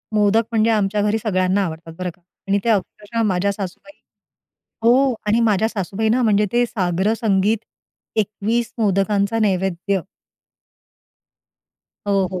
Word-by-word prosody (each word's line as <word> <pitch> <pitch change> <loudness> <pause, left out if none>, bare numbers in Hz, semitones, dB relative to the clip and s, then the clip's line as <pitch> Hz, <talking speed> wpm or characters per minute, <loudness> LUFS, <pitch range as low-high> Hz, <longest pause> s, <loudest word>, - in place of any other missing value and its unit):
मोदक 210 +2 +3
म्हणजे 225 0 +2
आमच्या 205 -1 +1
घरी 210 +1 +1
सगळ्यांना 185 -1 +1
आवडतात 165 -1 -7
बरं 180 -1 -2
का 180 - -33 0.3
आणि 200 +1 +2
त्या 230 -2 +4
अक्षरशः 210 +3 -4
माझ्या 195 +1 +1
सासूबाई 200 +8 -7 0.9
हो 255 +3 +4
आणि 215 +3 +3
माझ्या 220 -2 +2
सासूबाईना 220 +4 0
म्हणजे 210 -1 +3
ते 240 0 +3
साग्रसंगीत, 200 +1 +1 0.6
21 220 +3 -1
मोदकांचा 200 0 +1
नैवेद्य. 190 -1 0 2.1
हो, 195 -2 +2
हो. 185 - -3
205 Hz, 120 wpm, -20 LUFS, 190-225 Hz, 2.1 s, त्या